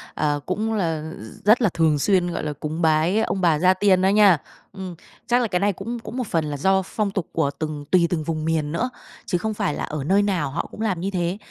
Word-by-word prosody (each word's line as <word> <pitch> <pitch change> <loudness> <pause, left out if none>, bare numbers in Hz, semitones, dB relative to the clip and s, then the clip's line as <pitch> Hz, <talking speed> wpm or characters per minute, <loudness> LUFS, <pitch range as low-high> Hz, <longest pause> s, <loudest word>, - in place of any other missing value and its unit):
à, 145 -1 0
cũng 220 +4 -1
là 165 -6 -1
r 110 +1 -11
rất 220 +4 +6
là 215 - +4
thường 160 -3 +2
xuyên, 180 +1 +2
gọi - - -3
là, 150 -1 -2
cúng 155 +3 -5
bái 160 +5 +3
ông 200 -3 -1
bà 165 -4 +3
gia 185 +2 +5
tiên 185 -1 +3
đó 190 - +4
nha. 200 -4 +6 0.4
Ừm. 190 -3 -7 0.3
Chắc 245 +1 +3
là 240 - +1
cái 180 -4 0
này 200 +1 +2
cũng 230 +6 -5
cũng 230 +2 -8
một 250 - -2
phần 165 -4 0
là 145 -1 -4
do 190 +6 +3
phong 210 -1 -2
tục 190 -5 -3
của 160 -4 +1
từng 155 -2 -4
tùy 175 -2 +5
từng 165 -3 -1
vùng 155 0 -3
miền 155 -2 0
nữa, 230 +10 -1 0.4
chứ 180 - 0
không 215 +5 -2
phải 150 - -1
là - - -4
ở 150 -3 -4
nơi 195 +7 +3
nào 185 -8 0
họ 155 - -3
cũng 215 - -8
làm 195 -6 0
như 190 +3 -2
thế. 180 0 -1
180 Hz, 260 wpm, -23 LUFS, 155-200 Hz, 0.4 s, rất